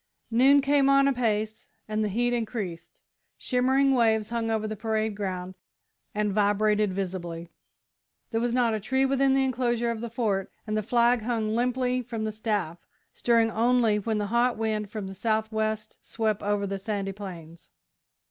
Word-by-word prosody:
Noon 270 +5 +5
came 275 0 +3
on 275 0 +5
apace 220 -5 -1 0.2
and 215 0 -1
the 210 - 0
heat 240 +4 0
increased. 215 -7 -5 0.3
Shimmering 265 +2 +2
waves 220 -3 +2
hung 230 -1 -2
over 220 -1 0
the 215 - -4
parade 220 0 -1
ground 185 -2 -4 0.6
and 210 -1 0
vibrated 210 0 +2
visibly. 175 -3 -4 0.8
There 225 -1 0
was 240 0 0
not 240 -2 +2
a 215 - -1
tree 265 +6 +1
within 270 0 +2
the 270 - +3
enclosure 240 -2 0
of 225 -1 -5
the 235 - -4
Fort, 215 -5 -1
and 215 -1 -2
the 215 - +1
flag 235 +2 +2
hung 220 -1 -1
limply 250 +1 0
from 230 -2 -5
the 215 - -1
staff, 210 -6 -2 0.3
stirring 230 -1 +2
only 230 -1 +2
when 220 +1 -1
the 210 - -1
hot 240 0 +2
wind 215 -2 -2
from 210 -1 -5
the 190 - -7
south 220 +2 -1
west 220 0 -2
swept 220 -2 -1
over 205 0 0
the 195 0 -3
sandy 200 -1 -3
plains. 170 -5 -10
220 Hz, 170 wpm, -27 LUFS, 210-240 Hz, 0.8 s, Noon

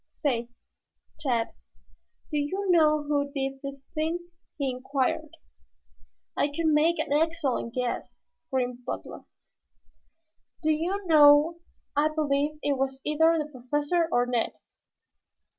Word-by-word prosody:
"Say, 240 -5 -2 0.7
Tad, 245 -6 0 0.8
do 300 - 0
you 375 +8 -2
know 305 -3 +4
who 285 -1 0
did 270 -1 -3
this 275 -1 -7
thing?" 340 +2 -2 0.3
he 275 -3 0
inquired. 260 +1 -2 1.0
"I - - +2
could 295 +3 -3
make 315 +2 +3
an - - -1
excellent 300 -7 0
guess," 250 -1 -3 0.2
grinned 250 -1 -2
Butler. 245 - -6 1.4
"Do 315 - +3
you 360 +6 -1
know, 305 +1 +6 0.4
I 295 +2 +3
believe 300 -1 0
it 280 -2 0
was 265 0 -1
either 320 +2 +3
the 300 -1 -3
Professor 295 +6 0
or 245 -4 +3
Ned." 245 -2 0
290 Hz, 120 wpm, -27 LUFS, 270-315 Hz, 1.4 s, know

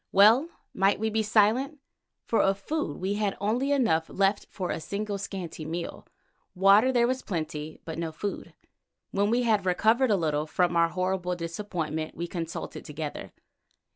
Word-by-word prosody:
Well 225 - +6 0.2
might 195 +1 +2
we 220 0 0
be 220 +1 +1
silent, 220 +7 +2 0.5
for 230 - +2
of 195 0 +2
food 245 - -3
we 190 +2 -1
had 205 -1 -1
only 240 +7 0
enough 225 - +2
left 195 +1 +1
for 185 -3 -4
a - - -2
single 200 +4 -4
scanty 185 -5 -6
meal. 170 +2 -5 0.5
Water 200 +7 +6
there 240 -2 +3
was 260 +2 -1
in - - -31
plenty, 155 -4 -4
but 160 0 -5
no 165 -1 -2
food. 195 +6 -5 0.6
When 200 +1 +1
we 240 +2 +2
had 215 -4 +2
recovered 220 +8 +3
a 210 - +4
little 155 -3 0
from 175 +2 +1
our 170 0 +4
horrible 185 0 -1
disappointment 165 -3 -4
we 170 - -2
consulted 170 -2 -5
together. 150 -1 -6
195 Hz, 170 wpm, -27 LUFS, 170-215 Hz, 0.6 s, Well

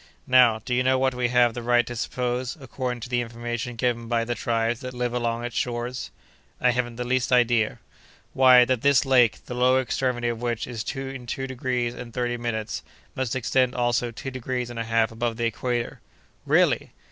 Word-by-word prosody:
Now, 125 -3 +5
do 125 - -2
you 125 - +3
know 130 +1 +3
what 130 0 +1
we 125 -1 0
have 120 -1 +3
the 120 - -5
right 120 0 +3
to 120 - -6
suppose, 125 +3 -2
according 125 -2 -4
to 120 - -7
the 120 -1 +1
information 120 +1 -4
given 120 -1 -1
by 115 -1 0
the 120 - -1
tribes 115 0 -1
that 130 0 -7
live 125 -1 -2
along 120 -1 -1
its 120 -1 -5
shores?" 120 +1 -3 0.5
"I 125 - +4
haven't 120 -1 -2
the 125 - -3
least 130 +1 0
idea." 120 -3 +3 0.6
"Why, 130 -1 +7
that 125 -2 0
this 140 0 +4
lake, 125 -4 +3
the - - -6
lower 125 +1 +3
extremity 125 -1 -1
of 115 -1 -4
which 120 -2 -2
is 115 -3 -5
in 135 -2 -6
two 135 +3 -3
degrees 125 -2 -2
and 125 -1 -8
thirty 120 -1 -1
minutes, 110 -2 -3 0.3
must 130 -1 -2
extend 130 0 +1
also 120 0 +1
two 135 +4 -7
degrees 125 -1 -3
and 120 - -6
a 115 - -2
half 115 0 +2
above 115 0 -2
the 120 - -1
equator." 120 +1 -2 0.5
"Really!" - - +2
120 Hz, 200 wpm, -25 LUFS, 120-125 Hz, 0.6 s, Why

